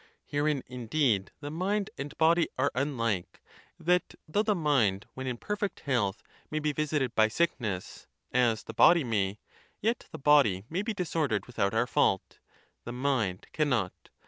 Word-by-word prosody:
Herein, 145 -1 0
indeed, 125 -4 0
the 145 0 -5
mind 200 +5 -1
and 140 +1 -7
body 165 +1 +4
are 140 +2 +2
unlike: 115 -8 -1 0.4
that 175 +1 +1
though 180 +7 +1
the 215 -1 +1
mind 125 - +2
when 130 0 -5
in 125 -2 -2
perfect 205 - -3
health 115 -7 0 0.3
may 155 - -3
be 150 0 0
visit 150 -1 0
ed 125 -2 -3
by 110 -1 +5
sickness, 110 - -2 0.2
as 120 -3 +2
the 115 - -8
body 170 +7 +6
may, 105 -4 0 0.4
yet 230 +2 -1
the - - -6
body 135 -10 +4
may 180 +4 0
be 215 +1 -3
dis 180 -3 -4
ordered 140 -10 +1
without 110 -4 -1
our 115 - +3
fault; 95 -5 +1 0.4
the 120 - -6
mind 125 -8 -1
cannot. 125 -11 +1
135 Hz, 165 wpm, -29 LUFS, 110-160 Hz, 0.4 s, body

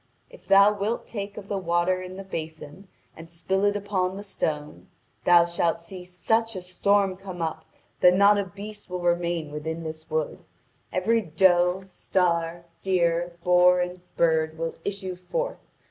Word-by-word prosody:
If - - -16
thou 200 +1 +7
wilt 210 +3 -2
take 200 -2 -6
of 200 -2 -8
the 200 -1 -2
water 175 +1 +1
in 185 0 -8
the 195 - -6
basin 160 0 -7 0.3
and 165 +1 -11
spill 190 +4 -1
it 205 0 +2
upon 190 -2 -1
the 200 - -7
stone, 150 -6 -4 0.4
thou 175 -1 +7
shalt 170 -1 -1
see 180 +1 -8
such 225 +5 0
a 185 - -5
storm 195 +1 +2
come 185 -2 -9
up 160 -1 -3 0.3
that 180 0 +6
not 200 +1 +5
a 200 - -1
beast 205 +3 -10
will 180 0 -4
remain 170 -3 0
within 160 +2 -4
this 160 0 -7
wood; 155 -1 -2 0.5
every 225 +5 +2
doe, 180 +1 +3
star, 170 -2 -1 0.2
deer, 175 -2 +1
boar, 180 0 +5
and 180 0 -3 0.2
bird 160 -1 +2
will 165 0 -3
issue 195 -2 -3
forth. - - -3
180 Hz, 160 wpm, -26 LUFS, 170-195 Hz, 0.5 s, thou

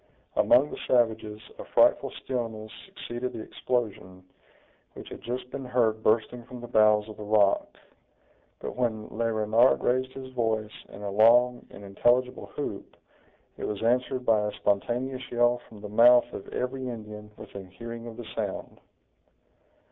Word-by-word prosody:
Among 140 +4 +4
the - - -7
savages 110 -3 +1 0.2
a - - -5
frightful - - +3
stillness 115 -4 -4 0.2
succeeded 125 -10 -5
the 110 - -6
explosion, 100 -6 -3 0.7
which - - -10
had - - -9
just 125 +1 -5
been 140 - -5
heard 115 -3 +1
bursting 110 +2 +1
from 125 -1 -9
the 120 - -8
bowels 110 -2 +4
of 110 - -10
the 105 - -7
rock. 105 -1 +2 0.8
But - - -5
when 110 -4 -2
Le 115 +1 -1
Renard 110 +3 +3
raised 130 +1 +1
his 130 -1 -9
voice 110 -3 -1 0.2
in 100 - -10
a 100 - -3
long 120 +4 +4
and 100 - -12
intelligible 120 +6 +1
whoop, - - -5 0.6
it - - -4
was 105 +1 -4
answered 125 +2 +1
by 110 -3 +3
a - - -2
spontaneous 125 +5 -1
yell 120 0 +2
from 105 -2 -13
the 105 - -6
mouth 120 +4 +6
of - - -7
every 130 +1 -3
Indian 105 -2 -8
within 95 -2 -10
hearing 115 +4 -8
of 115 -1 -9
the 120 - -7
sound. - - -4
115 Hz, 155 wpm, -27 LUFS, 110-125 Hz, 0.8 s, mouth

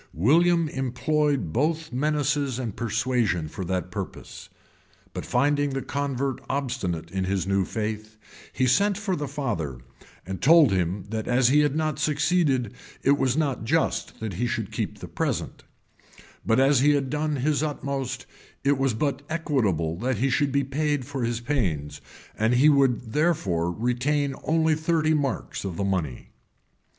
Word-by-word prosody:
William 165 - +4
employed 135 - 0
both 160 +3 0
menaces 145 -1 0
and 120 -6 -4
persuasion 115 -7 0
for 95 +5 -6
that 90 -1 -2
purpose; - - -7 0.6
but - - -5
finding 145 0 +2
the 135 0 -3
convert 140 -1 -2
obstinate 110 - -2
in 95 -1 -1
his 95 0 -1
new 95 0 +1
faith, 110 +1 -4 0.3
he 130 - 0
sent 200 - +3
for 200 -3 -1
the 145 -2 -3
father, 115 - -3 0.5
and 95 +1 -5
told 160 -3 +6
him 90 +1 0
that 110 -1 -3
as 125 0 +3
he 145 +3 +5
had 145 -1 +2
not 155 -2 -1
succeeded, 150 - +1 0.3
it 140 - +5
was 130 +1 +1
not 140 -7 0
just 115 - 0
that 110 -3 -4
he 120 +8 -1
should - - -3
keep - - -3
the - - -8
present; - - -3 0.8
but 115 +2 +2
as 135 0 +4
he 145 +2 +4
had 135 -2 -1
done 150 0 -1
his 145 +2 +1
utmost, 135 -4 -3 0.4
it 140 -1 +2
was 135 -4 +1
but 140 +2 -1
equitable 110 - 0
that 120 +7 -1
he 135 +2 +1
should 140 +2 +1
be 140 +1 +2
paid 145 0 -1
for 135 -2 -4
his 115 0 -1
pains; 95 - -2 0.3
and 110 +3 +2
he 140 +5 +6
would 130 -5 +2
therefore 100 - +1
retain 130 - 0
only 160 0 +3
thirty 155 0 +1
marks 145 -3 -2
of 95 -4 -4
the - - -1
money. 90 -10 -2
135 Hz, 160 wpm, -25 LUFS, 110-150 Hz, 0.8 s, told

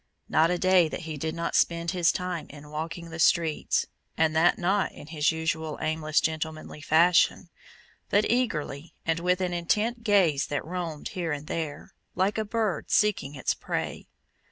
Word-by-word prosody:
Not 160 +1 +3
a 180 - +1
day 185 -3 +4
that - - -5
he 160 -2 -5
did 160 +3 -3
not 170 0 -3
spend 170 0 +2
his 175 -3 +3
time 180 -4 -4
in 150 +1 -12
walking 165 +2 -5
the 160 - -7
streets, 165 -1 +2 0.3
and 160 -1 +2
that 165 +2 +4
not 190 +3 +1
in - - -11
his 150 -1 +1
usual 160 -1 -2
aimless 155 0 +1
gentlemanly 160 -1 -3
fashion, 170 +3 +3 0.6
but 205 +1 +3
eagerly 170 - -1
and 165 0 +1
with 180 +2 +1
an 180 -1 -1
intent 215 +7 0
gaze 185 - +3
that 145 - -3
roamed 170 -3 -4
here 175 -5 -3
and 150 0 -4
there, 155 -2 -5 0.2
like 195 +4 +1
a - - +1
bird 215 -3 -1
seeking 200 -9 +1
its 130 - 0
prey. - - -4
165 Hz, 170 wpm, -27 LUFS, 155-180 Hz, 0.6 s, day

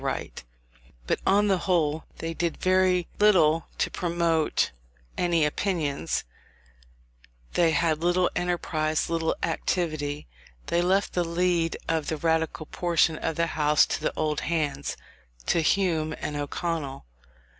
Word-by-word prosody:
But - - 0
on 205 +2 +4
the 190 -2 +2
whole 160 -4 0
they 165 0 -4
did 170 0 -2
very 185 -1 +2
little 165 -6 +4
to - - 0
promote 170 -3 +1 0.4
any 170 -3 +2
opinions; 150 - -1 1.3
they 170 -2 +4
had 160 0 +1
little 175 +1 +3
enterprise, 165 -3 -1
little 165 -1 0
activity: 155 -3 -1 0.4
they 170 - +1
left 190 +3 +1
the 175 - +1
lead 170 0 0
of 160 -2 0
the 160 - -1
Radical 160 0 0
portion 170 -1 +1
of 165 - -2
the 170 - +1
House 150 -1 +4
to - - -3
the - - -1
old 150 -1 0
hands, 145 -4 -2 0.5
to 170 - +2
Hume 160 -3 +1
and 150 - -4
O'Connell. 145 - -3
165 Hz, 125 wpm, -26 LUFS, 155-175 Hz, 1.3 s, on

